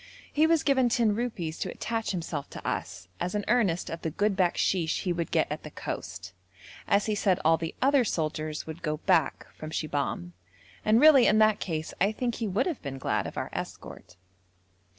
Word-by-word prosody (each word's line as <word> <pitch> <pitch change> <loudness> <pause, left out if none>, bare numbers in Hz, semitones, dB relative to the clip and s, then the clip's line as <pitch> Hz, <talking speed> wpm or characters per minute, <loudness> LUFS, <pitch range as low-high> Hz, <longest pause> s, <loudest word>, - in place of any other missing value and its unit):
He 310 +2 +4
was 330 -2 +3
given 265 -3 +3
ten 230 -2 +2
rupees 205 -9 -3
to - - -2
attach 225 -1 -3
himself 165 -6 -3
to - - -8
us, 90 +1 -4
as 180 - -2
an 205 - -1
earnest 210 -7 +2
of 165 - -5
the 160 - -2
good 205 +5 0
bakshish 175 -2 +1
he 180 - 0
would 170 -2 -3
get - - +2
at - - -3
the - - -8
coast, 95 +1 -6 0.5
as 200 +1 +3
he 215 - 0
said 195 -3 +2
all 165 +1 +6
the 165 0 -5
other 275 -1 +5
soldiers 155 -5 -2
would 160 +1 -8
go 155 -1 -1
back 165 -3 +1
from 155 - -8
Shibahm, 145 - -2 0.5
and 215 +2 +4
really 285 -4 +7
in 215 - +4
that 215 -1 +4
case 160 -3 -3
I 200 +2 +4
think 240 +1 -2
he 225 - 0
would 205 +7 +1
have 340 -7 -3
been 135 -2 -5
glad 130 - -1
of - - -9
our - - -3
escort. - - -7
185 Hz, 200 wpm, -28 LUFS, 160-225 Hz, 0.5 s, really